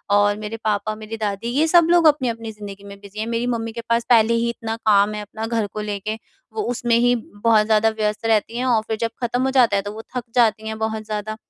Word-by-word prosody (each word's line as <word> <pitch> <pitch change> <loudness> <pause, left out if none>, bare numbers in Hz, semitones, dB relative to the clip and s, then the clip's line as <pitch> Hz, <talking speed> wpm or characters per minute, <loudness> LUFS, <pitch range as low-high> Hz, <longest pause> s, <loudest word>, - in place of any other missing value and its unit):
और 205 0 +3
मेरे 215 +1 -6
पापा, 215 0 0
मेरी 220 +1 -7
दादी 210 0 -3
ये 285 +6 +2
सब 340 0 +5
लोग 345 -1 +5
अपनी-अपनी 235 -7 0
ज़िंदगी 205 -2 -10
में 200 0 -11
बिज़ी 200 +1 -11
हैं। 215 - -1
मेरी 235 +1 -1
मम्मी 230 -2 -2
के 235 - -5
पास 230 0 +2
पहले 230 -1 +5
ही 230 0 +1
इतना 225 -1 -4
काम 205 -1 +4
है 210 - -4
अपना 220 +2 -6
घर 225 -2 -1
को 215 - -4
लेके 210 0 -3 0.4
वो 435 - -2
उसमें 240 -1 +1
ही 245 +1 +3
बहुत 220 -1 +1
ज़्यादा 220 0 +3
व्यस्त 215 0 -2
रहती 225 +1 +1
हैं 250 - -1
और 235 -4 +3
फिर 220 - -2
जब 230 - +1
ख़त्म 245 +1 0
हो 265 - +1
जाता 250 -6 +4
है 200 - +2
तो 205 - -6
वो 220 - -7
थक 250 - -2
जाती 220 -2 +2
हैं 220 0 -4
बहुत 220 0 -2
ज़्यादा, 215 0 -4
220 Hz, 250 wpm, -21 LUFS, 210-235 Hz, 0.4 s, सब